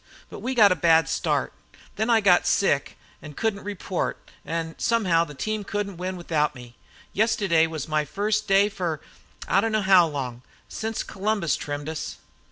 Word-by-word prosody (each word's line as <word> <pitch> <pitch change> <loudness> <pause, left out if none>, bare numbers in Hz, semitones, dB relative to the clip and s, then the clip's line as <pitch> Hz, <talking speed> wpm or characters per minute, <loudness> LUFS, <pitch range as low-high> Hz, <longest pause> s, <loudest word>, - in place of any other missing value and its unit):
But - - -8
we 260 +1 -3
got 210 -4 +7
a - - +3
bad 165 -1 +4
start. - - -1 0.4
There 220 +2 -1
I 225 -2 +4
got 185 -3 +4
sick 145 -8 +1 0.2
an' 150 -2 -10
couldn't 220 -3 -2
report, 200 -2 -3 0.3
an' 165 0 -3
somehow 185 -8 +2
the 150 -3 -11
team 215 +9 -3
can't 200 -1 -3
win 185 +1 -4
without 155 -4 0
me. 120 -1 -12 0.4
Yestiddy 200 -7 +2
was 160 -3 -5
my 155 -1 +1
first 210 +7 -1
day 195 +1 +5
fer 175 -7 -3 0.5
I 195 - +3
don't 225 +1 -1
know 215 -1 +1
how 190 -3 +6
long, 130 -5 -5 0.3
since 220 0 -4
Columbus 200 -5 -1
trimmed 145 0 -5
us." 160 -1 -5
185 Hz, 175 wpm, -25 LUFS, 160-210 Hz, 0.5 s, got